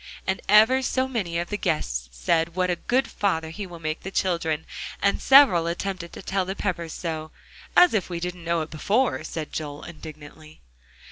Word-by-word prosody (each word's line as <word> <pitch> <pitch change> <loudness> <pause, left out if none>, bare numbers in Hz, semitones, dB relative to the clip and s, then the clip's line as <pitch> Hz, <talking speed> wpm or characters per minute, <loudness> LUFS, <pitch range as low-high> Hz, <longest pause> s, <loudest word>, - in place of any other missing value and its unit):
And 190 0 -1
ever 225 +5 +6
so 260 0 0
many 200 -10 -2
of 170 0 -2
the 210 - -1
guests - - -1
said 165 - 0
"What 185 -1 +1
a - - +1
good 250 +8 0
father 160 -6 -1
he 200 +3 -6
will 175 -1 -10
make 155 -1 -4
the 190 - -6
children," 170 -5 -1 0.3
and 200 - +1
several 265 -12 +6
attempted 175 0 -4
to - - -9
tell 190 0 0
the 190 +1 -4
Peppers 170 -5 -3
so. 160 -2 -4 0.5
"As 360 - +7
if 200 -5 0
we 170 -1 -3
didn't 180 0 -5
know 170 0 0
it 155 - -6
before," 210 - +1
said 160 -1 -6
Joel 145 -2 -5
indignantly. 155 -1 -11
170 Hz, 190 wpm, -25 LUFS, 160-200 Hz, 0.5 s, As